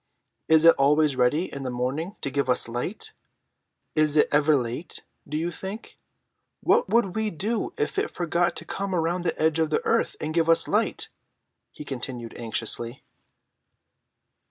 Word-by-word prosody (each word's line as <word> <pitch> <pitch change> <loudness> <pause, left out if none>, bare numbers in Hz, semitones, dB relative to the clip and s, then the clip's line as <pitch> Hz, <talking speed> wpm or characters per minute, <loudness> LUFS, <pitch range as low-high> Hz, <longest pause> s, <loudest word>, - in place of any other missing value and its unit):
Is 160 0 +5
it 165 - +9
always 150 +1 +4
ready 140 +8 +1
in 140 - -5
the 130 - -3
morning 135 - -3
to 140 - -2
give 140 -1 -1
us 125 - +1
light? 125 - -5 0.8
Is 155 -1 +3
it - - +5
ever 150 +1 +4
late, 125 +6 -5 0.3
do 150 - -2
you 170 +2 -1
think? 190 +5 -8 0.7
What 475 +1 +3
would 220 -5 +2
we 220 -1 0
do 210 +6 -2
if 405 - -1
it 415 - -1
forgot 175 +1 0
to - - -7
come 195 -1 -3
round 170 +1 0
the 165 - -1
edge 160 0 +2
of 160 -1 +2
the 155 - 0
earth - - +1
and 155 +1 -3
give 165 0 +2
us 165 - +4
light?" - - 0 0.6
he 150 - -10
continued 125 -3 -5
anxiously. 115 +1 -3
155 Hz, 165 wpm, -25 LUFS, 135-175 Hz, 0.8 s, it